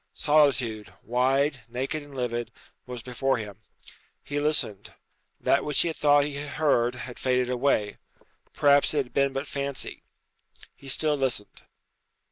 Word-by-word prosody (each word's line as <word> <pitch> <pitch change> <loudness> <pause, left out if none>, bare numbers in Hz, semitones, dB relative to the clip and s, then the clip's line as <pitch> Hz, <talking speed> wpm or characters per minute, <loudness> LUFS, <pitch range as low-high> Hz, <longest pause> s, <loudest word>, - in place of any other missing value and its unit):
Solitude, 125 -9 +2
wide, 135 +3 +1
naked 135 +6 -3
and 145 -1 -13
livid, 120 -2 -3 0.4
was 125 -2 -6
before 130 +1 0
him. 105 -2 -8 0.6
He 145 0 -3
listened. 145 -9 -1 0.4
That 140 - +2
which 150 -1 0
he 170 - +2
had 160 - -5
thought 145 -1 +5
he 145 -1 -4
heard 140 -4 +1
had 125 -1 -8
faded 125 -1 +1
away. 125 -5 0 0.5
Perhaps 145 0 +4
it 140 -2 +1
had 125 - -20
been 140 0 +2
but 135 +2 -3
fancy. 140 -2 -4 0.7
He 140 - -15
still 150 +3 +2
listened. 130 -7 -2
135 Hz, 140 wpm, -26 LUFS, 125-145 Hz, 0.7 s, thought